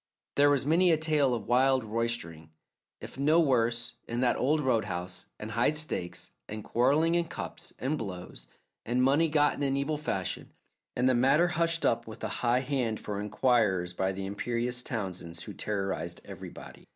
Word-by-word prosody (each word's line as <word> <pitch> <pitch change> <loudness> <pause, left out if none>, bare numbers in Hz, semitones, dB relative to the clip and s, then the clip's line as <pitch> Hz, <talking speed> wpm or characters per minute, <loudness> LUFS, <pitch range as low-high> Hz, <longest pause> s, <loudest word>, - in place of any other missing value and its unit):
There 145 0 +5
was 140 -2 +2
many 170 +4 +4
a 160 - +4
tale 150 -5 +2
of 110 -4 -5
wild 130 +1 +3
roistering, 110 -9 -3 0.5
if - - -9
no 155 +4 +4
worse, 120 -5 +1
in 120 +1 -2
that 125 -2 +3
old 150 +5 +2
roadhouse, 105 -9 -1
and 105 +1 -6
high 120 +7 +2
stakes, 145 - -4 0.2
and 105 0 -5
quarreling 145 +8 +2
in 170 0 +2
cups, - - -7
and 140 +4 -1
blows, 90 - -7 0.4
and 125 +2 +1
money 145 +5 +4
gotten 145 -1 +2
in 135 -1 +1
evil 145 +2 -1
fashion, 95 - -3 0.4
and 125 +1 +2
the 130 - +4
matter 135 +8 +4
hushed 165 0 0
up 115 0 +1
with 110 0 -10
a - - 0
high 120 +1 +3
hand 125 -5 -1
for 100 -1 -4
inquirers 105 -5 +1
by 95 +1 0
the 95 0 -5
imperious 120 +5 -2
Townsends 90 - -5
who - - -8
terrorized 95 -4 -3
everybody. - - -10
120 Hz, 170 wpm, -29 LUFS, 105-145 Hz, 0.5 s, There